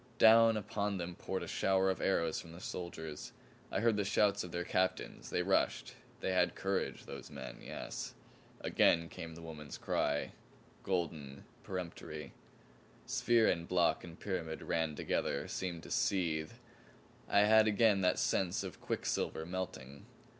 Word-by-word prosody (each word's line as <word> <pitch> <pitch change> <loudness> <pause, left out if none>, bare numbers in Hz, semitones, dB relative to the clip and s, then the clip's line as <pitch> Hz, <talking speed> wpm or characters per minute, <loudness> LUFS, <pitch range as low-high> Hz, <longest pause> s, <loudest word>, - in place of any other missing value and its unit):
Down 115 0 +7
upon 100 -1 -2
them 90 0 -4
poured - - -4
a - - -6
shower 95 0 +2
of 95 - -4
arrows 85 -4 +1
from 80 - -12
the 85 - -10
soldiers. 80 -4 -6 0.4
I 95 - 0
heard 115 -2 +3
the 105 - +2
shouts 100 0 +2
of 90 - -7
their 85 +1 -2
captains; 95 +1 -1
they - - 0
rushed. - - +1 0.3
They - - 0
had 90 -1 +2
courage 95 0 -2
those - - -8
men 65 -4 -8
yes! - - -6 0.5
Again 85 0 +3
came 80 -1 -7
the 85 - -10
woman's 75 -5 -7
cry 75 0 0 0.5
golden, 80 -7 -2 0.2
peremptory. 90 -3 -6 0.7
Sphere 115 -2 +3
and 85 0 +1
block 90 -2 +2
and 85 -1 -10
pyramid 85 -5 -3
ran 80 -2 0
together, 70 0 -1
seemed 85 -4 -4
to - - -10
seethe. 80 -5 +1 0.8
I 100 - +5
had 110 +1 +6
again 105 -2 +4
that 90 -1 +3
sense 95 -2 +1
of - - -6
a - - -26
quicksilver 80 - -2
melting. 70 -7 -6
90 Hz, 155 wpm, -34 LUFS, 80-100 Hz, 0.8 s, Down